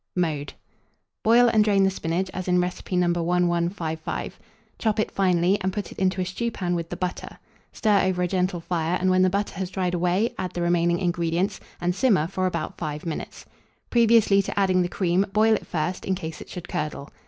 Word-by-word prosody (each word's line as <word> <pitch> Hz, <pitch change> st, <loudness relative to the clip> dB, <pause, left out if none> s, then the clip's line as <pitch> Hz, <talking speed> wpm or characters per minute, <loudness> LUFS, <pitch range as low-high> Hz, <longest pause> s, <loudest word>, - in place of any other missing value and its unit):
Mode. 155 Hz, -5 st, -1 dB, 0.7 s
Boil 240 Hz, +2 st, +6 dB
and 215 Hz, -2 st, +4 dB
drain 200 Hz, -2 st, +3 dB
the 195 Hz, -, +3 dB
spinach 180 Hz, +1 st, -2 dB
as 185 Hz, 0 st, -5 dB
in 180 Hz, 0 st, +3 dB
recipe 180 Hz, +1 st, -3 dB
No. 180 Hz, 0 st, +3 dB
1155; 175 Hz, -1 st, -1 dB, 0.4 s
chop 220 Hz, -1 st, 0 dB
it 215 Hz, -, 0 dB
finely, 185 Hz, +1 st, +2 dB
and 190 Hz, 0 st, 0 dB
put 205 Hz, +1 st, -5 dB
it -, -, -10 dB
into 190 Hz, 0 st, +1 dB
a -, -, -1 dB
stewpan 190 Hz, -1 st, -2 dB
with 170 Hz, -1 st, -3 dB
the -, -, -4 dB
butter; 180 Hz, 0 st, -4 dB, 0.3 s
stir 210 Hz, -2 st, +2 dB
over 180 Hz, -1 st, 0 dB
a -, -, +1 dB
gentle 180 Hz, -1 st, -1 dB
fire, 170 Hz, 0 st, -1 dB
and, 185 Hz, 0 st, +2 dB
when 185 Hz, 0 st, +4 dB
the 185 Hz, -, +5 dB
butter 200 Hz, +2 st, -1 dB
has 190 Hz, -2 st, -2 dB
dried 185 Hz, -1 st, -2 dB
away, 180 Hz, +6 st, +1 dB
add 180 Hz, -, -3 dB
the 175 Hz, -, -3 dB
remaining 170 Hz, 0 st, +2 dB
ingredients, 175 Hz, +2 st, -1 dB, 0.2 s
and 175 Hz, +1 st, 0 dB
simmer 195 Hz, -, +3 dB
for 185 Hz, +2 st, -1 dB
about 170 Hz, -3 st, -4 dB
5 150 Hz, -1 st, -4 dB
minutes. 165 Hz, -, -6 dB, 0.5 s
Previously 230 Hz, -4 st, +5 dB
to 195 Hz, -, -3 dB
adding 185 Hz, -2 st, +3 dB
the 175 Hz, -, +1 dB
cream, 180 Hz, 0 st, +1 dB
boil 220 Hz, +1 st, +4 dB
it 215 Hz, -, -2 dB
first, 175 Hz, +2 st, -2 dB
in 190 Hz, -, 0 dB
case 160 Hz, -4 st, -6 dB
it -, -, -11 dB
should 180 Hz, -, -7 dB
curdle. 150 Hz, -2 st, -4 dB
180 Hz, 200 wpm, -25 LUFS, 175-195 Hz, 0.7 s, Boil